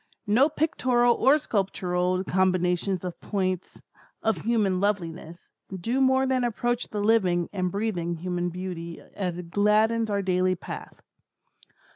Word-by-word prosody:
No 235 Hz, +8 st, +4 dB
pictorial 255 Hz, -6 st, +2 dB
or 270 Hz, +5 st, +4 dB
sculptural 185 Hz, -7 st, -1 dB
combinations 185 Hz, 0 st, +1 dB
of 180 Hz, -, -6 dB
points 185 Hz, -3 st, -3 dB, 0.4 s
of 220 Hz, -4 st, +1 dB
human 210 Hz, -3 st, +1 dB
loveliness, 175 Hz, -4 st, -3 dB, 0.3 s
do 240 Hz, +9 st, 0 dB
more 265 Hz, 0 st, +4 dB
than 260 Hz, -1 st, +1 dB
approach 240 Hz, +1 st, -1 dB
the 210 Hz, -, -4 dB
living 185 Hz, -6 st, +2 dB
and 185 Hz, -2 st, -1 dB
breathing 180 Hz, -5 st, -2 dB
human 175 Hz, +1 st, -2 dB
beauty 175 Hz, -2 st, -6 dB
as 180 Hz, -3 st, -3 dB
it 175 Hz, -1 st, -8 dB
gladdens 215 Hz, +3 st, +2 dB
our 200 Hz, -1 st, 0 dB
daily 185 Hz, 0 st, +1 dB
path. 180 Hz, -, -9 dB
195 Hz, 130 wpm, -26 LUFS, 180-225 Hz, 0.4 s, No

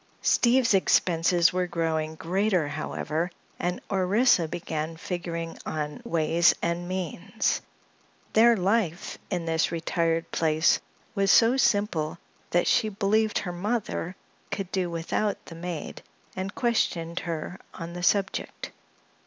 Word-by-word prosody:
Steve's 240 Hz, -1 st, +4 dB
expenses 175 Hz, -2 st, +3 dB
were 180 Hz, 0 st, 0 dB
growing 160 Hz, -2 st, -1 dB
greater, 185 Hz, 0 st, +1 dB
however, 160 Hz, +3 st, -2 dB, 0.3 s
and 180 Hz, 0 st, -1 dB
Orissa 190 Hz, -1 st, +3 dB
began 160 Hz, 0 st, -4 dB
figuring 170 Hz, -1 st, -4 dB
on 150 Hz, +6 st, -4 dB
"ways 170 Hz, -4 st, +3 dB
and 170 Hz, +1 st, -2 dB
means." 185 Hz, +3 st, -2 dB, 0.7 s
Their 230 Hz, +1 st, +6 dB
life 190 Hz, -2 st, 0 dB
in 175 Hz, -4 st, -2 dB
this 160 Hz, -1 st, +1 dB
retired 165 Hz, 0 st, -1 dB
place 160 Hz, 0 st, +3 dB, 0.3 s
was 195 Hz, 0 st, +1 dB
so 230 Hz, +5 st, +6 dB
simple 200 Hz, -11 st, +1 dB, 0.3 s
that 175 Hz, -, +2 dB
she 220 Hz, -3 st, +3 dB
believed 210 Hz, +2 st, +1 dB
her 180 Hz, -, -3 dB
mother 190 Hz, -2 st, -2 dB, 0.3 s
could 195 Hz, -2 st, -4 dB
do 185 Hz, -2 st, 0 dB
without 170 Hz, +5 st, -1 dB
the -, -, -10 dB
maid 170 Hz, -1 st, -6 dB, 0.3 s
and 190 Hz, +1 st, -4 dB
questioned 175 Hz, -8 st, 0 dB
her 170 Hz, +2 st, -5 dB, 0.2 s
on 170 Hz, -1 st, -6 dB
the 175 Hz, -, -6 dB
subject. 200 Hz, -, 0 dB
175 Hz, 120 wpm, -27 LUFS, 165-200 Hz, 0.7 s, Their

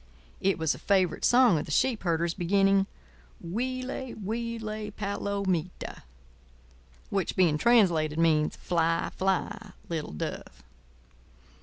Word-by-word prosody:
It 195 Hz, -, +1 dB
was 160 Hz, -2 st, +1 dB
a -, -, -10 dB
favourite 190 Hz, -4 st, +1 dB
song 240 Hz, -9 st, +5 dB
of -, -, -4 dB
the -, -, -6 dB
sheep 250 Hz, -, +2 dB
herders, 170 Hz, -1 st, 0 dB
beginning: 195 Hz, +2 st, +2 dB, 0.5 s
"Huile, 255 Hz, +7 st, -4 dB
huile, 220 Hz, 0 st, -4 dB
palomita," 200 Hz, -4 st, -3 dB, 1.1 s
which 195 Hz, -3 st, -1 dB
being 165 Hz, -5 st, +3 dB
translated 170 Hz, -9 st, +3 dB
means, 155 Hz, -2 st, +2 dB
"Fly, 165 Hz, -1 st, 0 dB
fly, 190 Hz, +1 st, -1 dB, 0.2 s
little 160 Hz, -, -4 dB
dove." 75 Hz, -4 st, -6 dB
190 Hz, 110 wpm, -28 LUFS, 165-215 Hz, 1.1 s, song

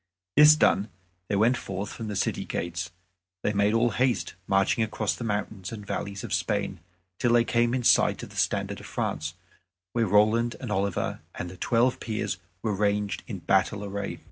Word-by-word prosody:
This 150 Hz, +1 st, +9 dB
done 105 Hz, -8 st, +3 dB, 0.4 s
they 100 Hz, -, 0 dB
went 115 Hz, +5 st, +4 dB
forth 95 Hz, +2 st, -5 dB
from 115 Hz, -, -6 dB
the 105 Hz, -, -4 dB
city -, -, 0 dB
gates. 85 Hz, 0 st, -3 dB, 0.5 s
They 105 Hz, -, +1 dB
made 100 Hz, +2 st, +2 dB
all 120 Hz, +1 st, +3 dB
haste, 125 Hz, +2 st, 0 dB
marching 95 Hz, +3 st, +2 dB
across 110 Hz, -1 st, -1 dB
the -, -, -6 dB
mountains 105 Hz, -3 st, -3 dB
and 105 Hz, -3 st, -7 dB
valleys 100 Hz, 0 st, -4 dB
of -, -, -4 dB
Spain 95 Hz, +2 st, -1 dB, 0.4 s
till 120 Hz, -1 st, +2 dB
they 120 Hz, -1 st, +5 dB
came 120 Hz, +1 st, +2 dB
in 125 Hz, -, -1 dB
sight -, -, +4 dB
of -, -, -9 dB
the -, -, -14 dB
standard -, -, 0 dB
of -, -, -10 dB
France, 80 Hz, +2 st, -3 dB, 0.6 s
where 115 Hz, -2 st, +1 dB
Roland 110 Hz, +4 st, +3 dB
and 125 Hz, -5 st, -5 dB
Oliver 100 Hz, -1 st, -1 dB, 0.2 s
and 90 Hz, -, -5 dB
the -, -, -10 dB
Twelve 120 Hz, +4 st, +2 dB
Peers 110 Hz, -2 st, -3 dB, 0.2 s
were 110 Hz, -2 st, 0 dB
ranged 100 Hz, 0 st, 0 dB
in 100 Hz, -7 st, -6 dB
battle 95 Hz, +3 st, +1 dB
array. 100 Hz, 0 st, -4 dB
105 Hz, 185 wpm, -27 LUFS, 100-115 Hz, 0.6 s, This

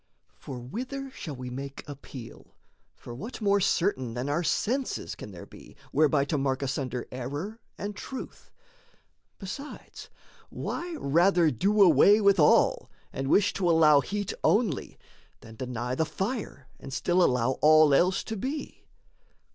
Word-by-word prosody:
For 130 Hz, -, -9 dB
whither 255 Hz, -, -6 dB
shall 155 Hz, -, -7 dB
we 125 Hz, -1 st, -7 dB
make 135 Hz, +2 st, -7 dB
appeal? 135 Hz, -4 st, -11 dB, 0.4 s
for 120 Hz, -, -10 dB
what 220 Hz, -, -7 dB
More 200 Hz, -2 st, +2 dB
certain 150 Hz, -, 0 dB
than 125 Hz, +3 st, -3 dB
our 150 Hz, +4 st, 0 dB
senses 255 Hz, -, -1 dB
can -, -, -9 dB
there 90 Hz, -4 st, -10 dB
be -, -, -15 dB, 0.2 s
Whereby 145 Hz, -1 st, +3 dB
to 145 Hz, 0 st, -1 dB
mark 135 Hz, 0 st, -1 dB
asunder 130 Hz, -2 st, -3 dB
error 145 Hz, -, -5 dB, 0.2 s
and 205 Hz, 0 st, -5 dB
truth? 260 Hz, +5 st, -8 dB, 0.9 s
Besides, 245 Hz, +10 st, -9 dB, 0.4 s
why 345 Hz, -1 st, -5 dB
rather 170 Hz, -, +3 dB
do 200 Hz, -, +3 dB
away 190 Hz, +5 st, +6 dB
with 200 Hz, -3 st, +4 dB
all, 150 Hz, -, +4 dB, 0.2 s
And 135 Hz, 0 st, -3 dB
wish 200 Hz, +4 st, +3 dB
to 180 Hz, -3 st, 0 dB
allow 155 Hz, -3 st, +6 dB
heat 200 Hz, +8 st, -3 dB
only, 205 Hz, -, +1 dB, 0.4 s
then 110 Hz, -, -13 dB
deny 125 Hz, -1 st, -4 dB
The 160 Hz, +5 st, 0 dB
fire 195 Hz, -, -4 dB
and 135 Hz, -, -9 dB
still 175 Hz, +6 st, +1 dB
allow 125 Hz, -2 st, +1 dB
all 155 Hz, -1 st, +6 dB
else 180 Hz, +6 st, +3 dB
to 225 Hz, -, -5 dB
be? 270 Hz, +8 st, -6 dB
155 Hz, 145 wpm, -27 LUFS, 130-205 Hz, 0.9 s, away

